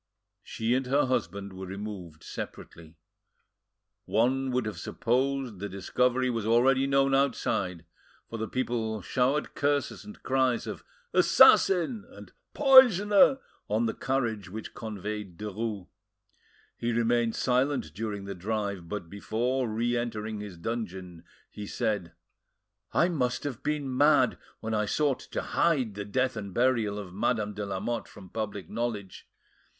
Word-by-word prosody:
She 115 +2 -2
and 130 0 0
her 140 +2 +3
husband 100 -6 -2
were 95 0 -7
removed 95 -5 -7
separately. 80 0 -8 1.1
One 130 +4 +1
would 125 -2 0
have 110 - -4
supposed 130 -3 -1
the 100 +1 -4
discovery 125 +7 +1
was 115 -3 -1
already 130 +5 +3
known 135 0 +3
outside, 100 -10 0 0.4
for 115 - -6
the 110 - -2
people 110 -4 -2
showered 135 - 0
curses 145 0 0
and 210 +1 -12
cries 130 -2 +1
of - - -6 0.3
"Assassin!" 195 +4 +5
and - - -13 0.2
"Poisoner!" 260 -3 +7 0.3
on 110 +3 +1
the 110 - 0
carriage 115 -8 -2
which 110 +3 -7
conveyed 105 -4 -6
Derues. 105 -1 -4 0.9
He 120 - -2
remained 115 0 +1
silent 130 - 0
during 105 0 -4
the 100 - -5
drive, 100 -2 -3
but 100 -5 -4
before 120 +6 -1
re 120 +3 0
entering 110 -3 -3
his 100 -4 -8
dungeon, 95 -4 -5 0.3
he 105 -1 -7
said— 100 -6 -2 0.8
"I 170 - +3
must 125 -7 -1
have 130 -5 -4
been 145 -3 -2
mad 145 +3 +4 0.2
when 110 0 -3
I 105 -1 +1
sought 145 +3 +1
to - - -5
hide 135 -10 +1
the 105 +1 -5
death 130 +5 0
and 100 -3 -6
burial 120 -4 +2
of 95 -4 -7
Madame 105 +1 0
de 105 0 -4
Lamotte 105 +5 -3
from 95 -3 -13
public 100 -5 -4
knowledge. 110 -5 -4
115 Hz, 140 wpm, -28 LUFS, 100-130 Hz, 1.1 s, Poisoner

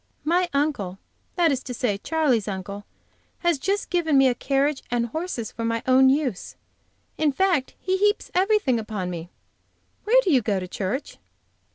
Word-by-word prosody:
"My 350 +3 +1
uncle 280 - -1 0.4
that 340 -3 +3
is 265 -2 -1
to 250 - -6
say 210 -5 -1
Charley's 270 -7 +1
uncle 200 +1 -5 0.6
has 345 -5 +2
just 400 +7 -1
given 325 -5 +2
me 270 0 +6
a 250 - +3
carriage 275 +3 0
and 240 -1 0
horses 240 - -4
for 230 - -6
my 230 0 -1
own 260 +1 +5
use. 265 -8 -1 0.6
In 305 -2 +3
fact, 335 -3 +1
he 375 0 0
heaps 415 +2 +1
everything 375 - +2
upon 210 -4 -4
me. 170 0 -6 0.8
Where 480 +4 +5
do 370 - +1
you 265 -4 +4
go 205 -3 0
to 185 - -6
church?" 200 +9 -4
265 Hz, 170 wpm, -24 LUFS, 220-335 Hz, 0.8 s, me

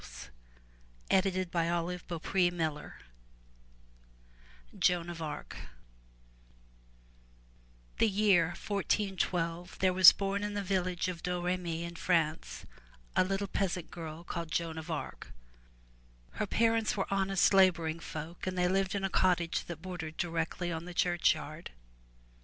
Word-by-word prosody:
305 185 -2 +1
MY 170 +1 0
BOOK 170 -3 -6
HOUSE 175 -5 0 1.9
JOAN 175 -1 +2
OF 165 -1 -8
ARC 150 -2 -6 2.4
the 225 - +4
year 195 -4 +4
1412, 180 -2 -2
there 185 -1 +2
was 185 0 +10
born 200 +1 -2
in 205 0 -3
the 205 - -1
village 185 -2 -1
of 175 -2 -5
Dom 180 -1 -2
re 180 +1 +1
my' 180 -2 -6 0.2
in 170 0 -7
France, 165 -3 0 0.5
a - - +5
little 195 +2 -1
peasant 185 -3 -2
girl 165 -1 -7
called 170 -1 -5
Joan 165 -1 -2
of 160 - -9
Arc. - - -5 1.0
Her 210 - -3
parents 225 0 +2
were 195 - 0
honest 195 0 +3
laboring 170 -4 +4
folk 165 +3 -7
and 185 0 -2
they 180 0 +3
lived 190 +1 +1
in 200 - -2
a 195 - +1
cottage 175 -3 +1
that 170 -1 -8
bordered 165 -4 -6
directly 170 0 -2
on 165 0 -4
the 175 -1 -9
churchyard. 170 -2 +1
180 Hz, 130 wpm, -31 LUFS, 170-190 Hz, 2.4 s, was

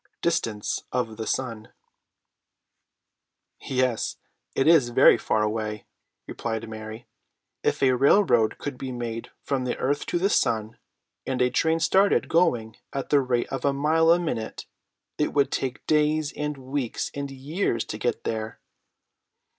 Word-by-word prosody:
DISTANCE 115 -11 -1
OF 120 -3 -1
THE 110 - -4
SUN. 115 -4 -3 1.9
"Yes, 130 -3 -1 0.4
it 135 - +2
is 160 -7 +6
very 120 - +6
far 110 -2 0
away," 105 -1 -3 0.4
replied 115 -1 -4
Mary. 110 +2 -8 0.6
"If - - 0
a 130 - +5
railroad 125 - +4
could 140 -3 -6
be 130 -1 -4
made 115 -2 -5
from 135 -2 -1
the 125 - -2
earth 145 +2 -1
to - - 0
the 185 +3 +2
sun, 110 0 0 0.5
and 130 -2 -1
a 125 0 +3
train 160 0 +2
started 190 +5 +3
going 120 -10 +1
at 135 - -4
the 145 - +6
rate 125 -2 0
of 135 -2 -4
a 140 - +2
mile 155 +4 +3
a 170 - +7
minute, 125 -11 -4 0.5
it 150 - 0
would 140 -1 +2
take 130 -1 -3
days 150 0 +2
and 150 -1 -3
weeks 130 -2 -3
and 140 0 -4
years 135 - -2
to - - -6
get - - -1
there. 110 0 -4
130 Hz, 145 wpm, -25 LUFS, 115-150 Hz, 1.9 s, a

